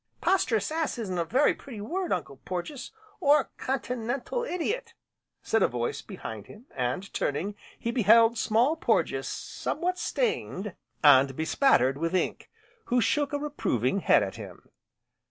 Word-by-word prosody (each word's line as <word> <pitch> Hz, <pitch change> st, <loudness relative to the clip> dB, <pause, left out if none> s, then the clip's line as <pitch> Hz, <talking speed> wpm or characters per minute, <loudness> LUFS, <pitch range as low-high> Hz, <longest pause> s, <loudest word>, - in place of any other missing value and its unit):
"Posterous 240 Hz, -, +1 dB
ass, 320 Hz, -4 st, -1 dB
isn't 190 Hz, -6 st, -3 dB
a -, -, +2 dB
very 255 Hz, -, +3 dB
pretty 245 Hz, -6 st, -10 dB
word, 355 Hz, -, -3 dB
Uncle 160 Hz, -6 st, -2 dB
Porges, 185 Hz, -, -6 dB, 0.3 s
or 295 Hz, -3 st, +3 dB
continental 250 Hz, -, -2 dB
idiot!" 445 Hz, +3 st, -3 dB, 0.5 s
said 225 Hz, -, +1 dB
a -, -, +5 dB
voice 120 Hz, -1 st, -3 dB
behind 110 Hz, -2 st, -8 dB
him, 220 Hz, +4 st, -14 dB
and 130 Hz, +10 st, -2 dB
turning, 160 Hz, +9 st, -1 dB, 0.2 s
he 235 Hz, -, -2 dB
beheld 230 Hz, 0 st, +5 dB
Small 235 Hz, +6 st, +2 dB
Porges 320 Hz, -, 0 dB
somewhat 360 Hz, +3 st, -3 dB
stained, 350 Hz, -, -2 dB, 0.3 s
and 135 Hz, -2 st, +6 dB
bespattered 155 Hz, -, +3 dB
with 165 Hz, +3 st, -1 dB
ink, 185 Hz, -, -1 dB, 0.4 s
who 245 Hz, -, +2 dB
shook 285 Hz, +5 st, +1 dB
a 290 Hz, -, 0 dB
reproving 200 Hz, -, -1 dB
head -, -, +4 dB
at -, -, -5 dB
him. -, -, -11 dB
230 Hz, 140 wpm, -28 LUFS, 175-290 Hz, 0.5 s, and